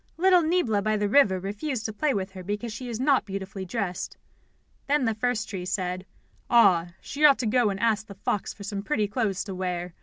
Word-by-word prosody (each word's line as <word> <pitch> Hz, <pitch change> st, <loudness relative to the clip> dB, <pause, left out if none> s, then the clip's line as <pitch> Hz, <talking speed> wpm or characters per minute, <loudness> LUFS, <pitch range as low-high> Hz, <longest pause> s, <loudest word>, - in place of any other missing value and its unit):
Little 365 Hz, +1 st, +5 dB
Niebla 315 Hz, -, +1 dB
by 215 Hz, +1 st, +1 dB
the 205 Hz, 0 st, 0 dB
river 205 Hz, -5 st, +4 dB
refused 215 Hz, +6 st, -4 dB
to 220 Hz, -, -3 dB
play 290 Hz, +8 st, +1 dB
with 195 Hz, -4 st, -2 dB
her 190 Hz, -1 st, -9 dB
because 210 Hz, +4 st, -4 dB
she 245 Hz, +2 st, -6 dB
is 230 Hz, -1 st, -4 dB
not 270 Hz, 0 st, +3 dB
beautifully 195 Hz, -1 st, -6 dB
dressed." 185 Hz, -2 st, -4 dB, 0.7 s
Then 285 Hz, -2 st, +2 dB
the 225 Hz, -, +1 dB
first 225 Hz, 0 st, -1 dB
tree 190 Hz, -3 st, -5 dB
said: 185 Hz, 0 st, -3 dB, 0.4 s
"Ah, 180 Hz, -8 st, +4 dB
she 290 Hz, +2 st, -5 dB
ought 285 Hz, -2 st, +8 dB
to 250 Hz, -, -2 dB
go 230 Hz, 0 st, +3 dB
and 195 Hz, -1 st, -3 dB
ask 220 Hz, -1 st, +1 dB
the 200 Hz, -, -10 dB
fox 200 Hz, +1 st, -2 dB
for 200 Hz, -, -11 dB
some 200 Hz, 0 st, -4 dB
pretty 215 Hz, -2 st, 0 dB
clothes 205 Hz, -3 st, -1 dB
to 195 Hz, -, -6 dB
wear. 180 Hz, -1 st, -3 dB
210 Hz, 215 wpm, -26 LUFS, 190-245 Hz, 0.7 s, ought